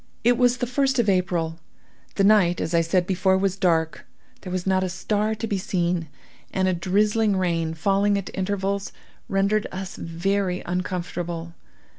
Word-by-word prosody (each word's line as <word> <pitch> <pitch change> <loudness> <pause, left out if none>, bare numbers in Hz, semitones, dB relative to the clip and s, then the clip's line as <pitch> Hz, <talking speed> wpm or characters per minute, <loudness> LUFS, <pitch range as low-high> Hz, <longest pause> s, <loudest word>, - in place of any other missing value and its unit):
"It 245 +1 +5
was 245 0 +3
the 245 - -1
first 265 +2 +1
of 235 -3 +2
April. 175 -4 0 0.6
The 195 - +2
night, 195 -4 +4
as 165 - -2
I 170 - +4
said 175 +2 +1
before, 190 0 +2
was 190 -1 0
dark; 165 -4 0 0.3
there 185 - -7
was 180 -1 -2
not 190 -1 +2
a 185 - -1
star 210 +4 -1
to 220 - -4
be 205 -3 -1
seen; 175 -3 -1 0.4
and 190 -1 +1
a 185 - +2
drizzling 205 +4 +1
rain, 165 -3 0
falling 200 +4 +2
at 195 - -5
intervals, 195 +1 -2 0.4
rendered 200 +2 +1
us 185 0 -6
very 180 +2 -1
uncomfortable. 175 -2 -3
190 Hz, 165 wpm, -24 LUFS, 175-205 Hz, 0.6 s, It